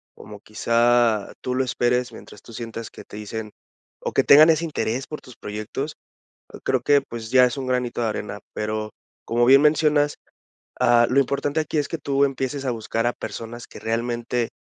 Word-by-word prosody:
como 105 -1 -11
quizá 115 0 +2
tú 125 - -2
lo 130 +1 +1
esperes, 125 -1 0
mientras 105 - -13
tú - - -14
sientas 115 0 -6
que - - -12
te 105 - -11
dicen 105 0 -6 0.5
o - - -3
que - - +3
tengan 155 +3 +8
ese 165 +1 +3
interés 130 -5 -2
por 150 - -8
tus 125 - -14
proyectos, 110 +9 -5 0.7
creo 130 -2 +1
que, 145 +2 +4
pues, 115 -3 -8
ya 130 -1 +6
es 125 - -3
un 135 - -4
granito 125 -1 -1
de 115 - +1
arena. 105 - -5
Pero, 110 0 -3 0.4
como 120 +1 +2
bien 135 +3 +7
mencionas, 150 -1 +3 0.7
ah, 120 0 +5
lo 135 - +4
importante 140 +3 0
aquí 155 0 -2
es 145 - +1
que 165 - -3
tú 140 0 +1
empieces 135 0 -3
a 125 - +1
buscar 115 0 -2
a 120 - +2
personas 115 +1 -7
que - - -12
realmente 120 +1 -2
120 Hz, 190 wpm, -23 LUFS, 115-140 Hz, 0.7 s, tengan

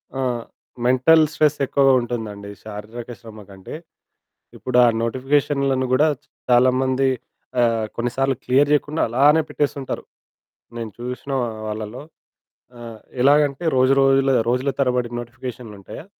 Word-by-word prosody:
ఆ! 135 - -2 0.6
Mental 130 +6 +5
stress 150 -1 +2
ఎక్కువగా 135 0 +3
ఉంటుందండి 110 -4 -5
శారీరక 110 +3 -8
శ్రమకంటే. 105 -2 -11 0.8
ఇప్పుడు 125 -1 -3
ఆ - - +6 0.2
నోటిఫికేషన్లను 135 +1 0
గూడా 150 +5 +4 0.4
చాలామంది 130 +2 +3 0.9
కొన్నిసార్లు 135 +3 0
ఆహ్, - - -36
క్లియర్ 140 +3 +3
జేయకుండా 150 +1 +1
అలానే 145 +7 +4
పెట్టేస్తుంటారు. 140 -2 -3 0.7
నేను 115 -2 -5
చూసిన 125 +3 -6 0.4
వాళ్ళలో, 110 +3 -6 0.8
ఆ! - - -13 0.4
ఎలాగంటే 145 +2 +3
రోజు 130 +1 +4
రోజులు 135 0 +3 0.2
రోజుల 125 +3 0
తరబడి 125 -3 +1
నోటిఫికేషన్లుంటాయా, 120 - -9
130 Hz, 105 wpm, -21 LUFS, 120-140 Hz, 0.9 s, ఆ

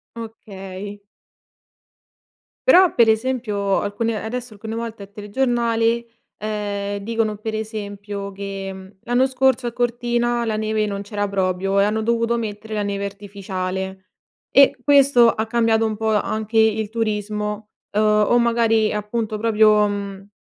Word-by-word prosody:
Okay. 205 -3 -8 1.7
Però 370 -7 +7
per 235 -2 +5
esempio 220 -4 +1
alcune 215 +2 -2
adesso 240 +1 -5
alcune 220 +2 -6
volte 230 -2 -5
al 200 - -14
telegiornale, 230 +1 0 0.3
ehm, 205 -1 -3
dicono 220 0 -1
per 220 +1 -4
esempio 205 -2 -5
che: 195 -1 -7
"L'anno 245 +2 +2
scorso 260 -1 +1
a - - -2
Cortina 240 0 0
la 220 -2 -1
neve 215 0 0
non 200 -1 -3
c'era 205 0 -3
proprio 195 0 0
e 200 - +5
hanno 215 +1 0
dovuto 230 +1 +1
mettere 220 -1 -5
la 210 -1 -1
neve 200 0 -2
artificiale," 190 -1 -5 0.4
e 280 -1 +6
questo 275 -4 +6
ha 220 - -2
cambiato 225 -1 +2
un 220 -1 -1
po' 220 +1 -1
anche 215 +1 -1
il 220 -1 +3
turismo, 210 -1 -3 0.2
o 210 +2 +3
magari 230 -2 +2
appunto 215 +1 -2
proprio, 215 -1 +4
mhmm, 200 -1 -5
215 Hz, 130 wpm, -21 LUFS, 205-230 Hz, 1.7 s, Però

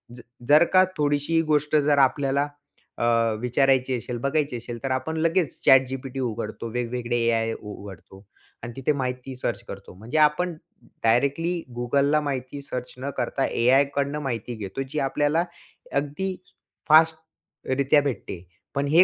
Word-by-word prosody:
जर 120 - -11 0.3
जर 150 +3 +7
का 185 0 +7
थोडीशी 145 +2 +1
गोष्ट 150 -1 +1
जर 145 -1 +3
आपल्याला, 140 +1 +2 0.5
अ, - - -2 0.4
विचारायची 130 +1 +2
असेल, 120 +1 -5
बघायची 145 -3 0
असेल, 120 0 -7
तर 135 - -1
आपण 130 +5 -2
लगेच 165 0 0
ChatGPT 135 0 +3
उघडतो, 115 -1 -4
वेगवेगळे 120 0 -2
एआय 115 -1 +1
उ 105 -1 -8
उघडतो, 95 0 -12 0.4
आणि 120 0 -6
तिथे 135 +3 0
माहिती 125 0 -4
सर्च 125 - -3
करतो. - - -9
म्हणजे 115 +10 -4
आपण 155 +3 +3 0.5
डायरेक्टली 140 +9 +2 0.2
Googleला 140 +5 +2
माहिती 140 0 -4
सर्च 125 -2 -6
न 135 +2 -4
करता, 130 +2 0
एआयकडनं 140 +4 +2
माहिती 120 -3 -4
घेतो, 105 +4 -5
जी 150 - -2
आपल्याला 145 +4 +1 0.5
अगदी 150 +7 -1 0.5
फास्टरीत्या 155 -3 +2
भेटते. 110 -9 -4 0.3
पण 140 0 0
हे 165 +5 +7
135 Hz, 140 wpm, -25 LUFS, 125-150 Hz, 0.5 s, जर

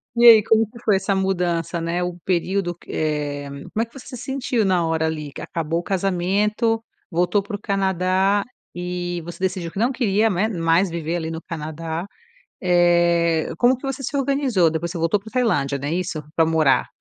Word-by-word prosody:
E 240 0 +6
aí 220 -2 +9
como 220 +2 +4
é - - +2
que 235 0 -14
foi 210 - +4
essa 195 +1 0
mudança, 175 -3 -1
né, 170 +2 -1
o 180 -1 -3
período 185 0 0
que - - -12
é 145 -2 -2
como 140 +11 -3
você 265 0 -10
sentiu 250 -2 -1
na 185 -4 +2
hora 160 0 0
ali 155 -2 -4
que - - -8
acabou 165 0 -2
o - - -6
casamento 200 +5 0 0.3
voltou 180 +4 +1
pro 205 +1 -5
Canadá, 190 0 +1 0.3
e 175 0 -3
você 170 +1 -8
decidiu 185 -2 -2
que - - -11
não 240 +4 +2
queria, 225 -4 +2
né, 190 +4 +1
mais 170 -1 +2
viver 165 0 -3
ali 160 -1 -3
no 160 - -4
Canadá. 160 +2 -5 0.5
Eh, 170 -2 +3
como 250 +2 +4
que 250 - -22
você 270 0 -3
se 270 +2 -3
organizou? 270 - +2
Depois 165 +2 -3
você 175 - -5
voltou 165 +5 +2
pra 215 - -12
Tailândia, 145 - +1
não 140 +2 -4
é 160 - -1
isso? 175 -3 -3
Pra 165 - +4
morar. 160 -4 +3
180 Hz, 190 wpm, -22 LUFS, 165-210 Hz, 0.5 s, aí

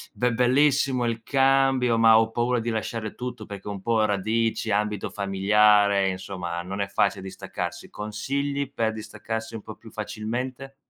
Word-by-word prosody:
"Be 125 0 +1
bellissimo 130 +1 +3
il 115 -1 -2
cambio, 135 -3 +3
ma 115 0 +7
ho 110 0 0
paura 120 +1 +1
di 115 - -4
lasciare 110 -1 -3
tutto." 125 -3 -6
Perché 100 -1 -9
ho - - -3
un 100 -2 -5
po' 110 +1 +2
radici, 110 +2 0
ambito 105 0 0
familiare, 100 0 +3
insomma 90 -2 -5
non 95 +3 -5
è - - -1
facile 100 -1 0
distaccarsi. 95 - -6
Consigli 140 +7 -3
per 110 -1 0
distaccarsi 110 +1 -6
un 110 - -6
po' 110 - -9
più 115 - -15
facilmente? 120 +5 -5
110 Hz, 160 wpm, -25 LUFS, 105-125 Hz, -, ma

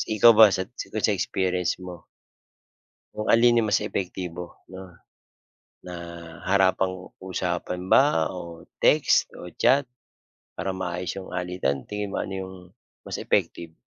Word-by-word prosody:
ikaw 115 +3 +8
ba 110 - +12
sa 95 - -1 0.3
kung - - 0
sa - - +1
experience 90 -2 0
mo 90 -1 -7 1.2
Kung 105 - -4
alin 120 +1 +5
yung 110 - -1
mas 105 - +2
epektibo 90 -2 -4 0.3
'no? 95 -1 -10 0.9
Na 90 - -7 0.5
harapang-usapan 95 -2 -1
ba, 130 - +4
o 85 -2 -9 0.2
text, - - +4
o 90 - -9
chat, 140 +2 +5 0.7
para 95 - -2
maayos 90 0 -3
yung 95 - -9
alitan. 90 -7 -2
Tingin 105 -1 -3
mo, - - -4
ano 95 - -6
yung 95 0 -9 0.5
mas - - -5
effective? 85 -1 -1
95 Hz, 130 wpm, -25 LUFS, 90-100 Hz, 1.2 s, ba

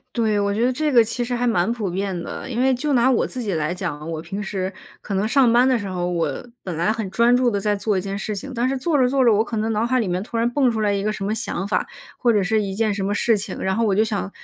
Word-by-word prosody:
对， 220 -3 +1
我 200 0 0
觉 230 +3 +1
得 255 - +1
这 305 +3 0
个 240 -3 +7
其 230 +2 -1
实 245 - -3
还 245 0 0
蛮 220 -1 +2
普 215 -6 -2
遍 190 -1 -3
的， - - -7
因 240 0 -1
为 265 0 +3
就 295 +4 -2
拿 255 -1 +4
我 250 - +2
自 255 - -5
己 205 -5 -2
来 155 +1 -1
讲， 165 -4 -5
我 160 -1 -4
平 195 +5 -5
时 190 -1 -3 0.3
可 200 - -6
能 195 +2 +1
上 245 +1 +4
班 245 +2 +5
的 255 -3 +2
时 200 - -5
候， 180 -1 -2
我 165 - -2 0.2
本 180 -3 -4
来 170 +6 +1
很 220 -3 -3
专 235 +4 +3
注 250 -1 +3
地 200 -3 -1
在 205 0 0
做 205 0 0
一 185 - 0
件 195 +1 -4
事 210 0 -3
情， 270 +8 -6
但 240 +1 0
是 270 - -1
做 300 +4 0
着 250 - +4
做 265 0 +2
着， 235 - +5
我 210 - +3
可 230 +1 -3
能 220 +1 0
脑 220 +2 0
海 255 -1 +2
里 195 - -2
面 180 +1 -1
突 230 - -8
然 230 +1 +2
蹦 265 -1 +3
出 220 -2 -1
来 210 - +2
一 200 -1 0
个 215 +1 -1
什 195 - -5
么 205 - -1
想 200 -4 -3
法， 205 - -1 0.3
或 240 -2 +2
者 205 -3 +2
是 220 +3 +1
一 195 -2 -4
件 215 -1 +1
什 195 - -3
么 205 - 0
事 225 +1 +2
情， 200 - -5
然 190 - 0
后 230 - +2
我 195 -2 +2
就 215 - +4
想 205 -3 -2
215 Hz, 345 characters per minute, -22 LUFS, 195-240 Hz, 0.3 s, 个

